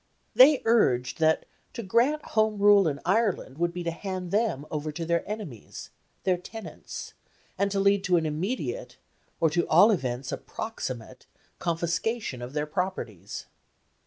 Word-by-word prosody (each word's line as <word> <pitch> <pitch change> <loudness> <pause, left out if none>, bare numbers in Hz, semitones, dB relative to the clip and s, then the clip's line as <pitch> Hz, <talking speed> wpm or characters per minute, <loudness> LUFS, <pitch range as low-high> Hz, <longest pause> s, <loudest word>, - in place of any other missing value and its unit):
They 270 +2 +7
urged 130 - +2
that 160 0 +3 0.3
to 235 - -5
grant 245 +10 +2
Home 215 -1 +2
Rule 205 -2 +6
in 140 -2 -2
Ireland 190 - 0
would 175 0 +1
be 175 0 -5
to 170 - -1
hand 185 0 -5
them 205 - 0
over 155 0 -3
to 165 +2 -5
their 170 0 +1
enemies, 200 - -7 0.3
their 185 -2 +2
tenants, 220 +5 -8 0.4
and 200 +1 +1
to 200 0 -1
lead 200 0 +3
to 180 -2 +4
an 165 - 0
immediate, 195 - -3 0.4
or 165 -2 +3
to 170 +2 +1
all 190 +8 +7
events 130 - -2
a - - -2
proximate, 130 - -6 0.3
confiscation 170 - -1
of 125 +2 -7
their 150 0 -1
properties. 150 - -4
180 Hz, 155 wpm, -27 LUFS, 155-210 Hz, 0.4 s, They